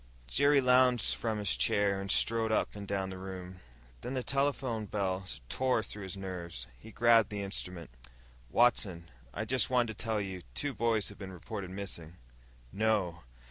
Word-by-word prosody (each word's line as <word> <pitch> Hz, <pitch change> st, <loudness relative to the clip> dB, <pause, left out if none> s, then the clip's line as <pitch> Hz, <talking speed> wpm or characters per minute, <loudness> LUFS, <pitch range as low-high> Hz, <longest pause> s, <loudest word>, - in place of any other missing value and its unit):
Jerry 140 Hz, -, +4 dB
lunged 125 Hz, -2 st, +5 dB
from 110 Hz, -2 st, -2 dB
his 105 Hz, -2 st, +1 dB
chair 100 Hz, -1 st, +2 dB
and 100 Hz, -, -6 dB
strode 115 Hz, +2 st, +3 dB
up 110 Hz, -, +1 dB
and 100 Hz, -1 st, -7 dB
down 95 Hz, -1 st, -2 dB
the 95 Hz, -, -7 dB
room. 95 Hz, -1 st, -7 dB, 0.4 s
Then 130 Hz, -, -4 dB
the 130 Hz, -, -1 dB
telephone 135 Hz, -6 st, 0 dB
bell 95 Hz, -2 st, -1 dB, 0.2 s
tore 130 Hz, -, +1 dB
through 105 Hz, 0 st, -6 dB
his 95 Hz, 0 st, -5 dB
nerves. 85 Hz, -9 st, -5 dB
He 110 Hz, -, -12 dB
grabbed 115 Hz, -1 st, +5 dB
the 100 Hz, -2 st, -3 dB
instrument. 90 Hz, -5 st, -4 dB, 0.6 s
"Watson. 95 Hz, -, +2 dB, 0.2 s
I 110 Hz, -, -3 dB
just 130 Hz, +3 st, +1 dB
wanted 120 Hz, -3 st, +2 dB
to -, -, -4 dB
tell 110 Hz, -2 st, 0 dB
you, 95 Hz, -2 st, -4 dB
two 145 Hz, -1 st, 0 dB
boys 115 Hz, -3 st, +1 dB
have 105 Hz, -, -11 dB
been 95 Hz, -2 st, -7 dB
reported 95 Hz, +2 st, -6 dB
missin'." 90 Hz, -3 st, -6 dB, 0.5 s
"No!" 100 Hz, -6 st, 0 dB
105 Hz, 170 wpm, -32 LUFS, 95-115 Hz, 0.6 s, lunged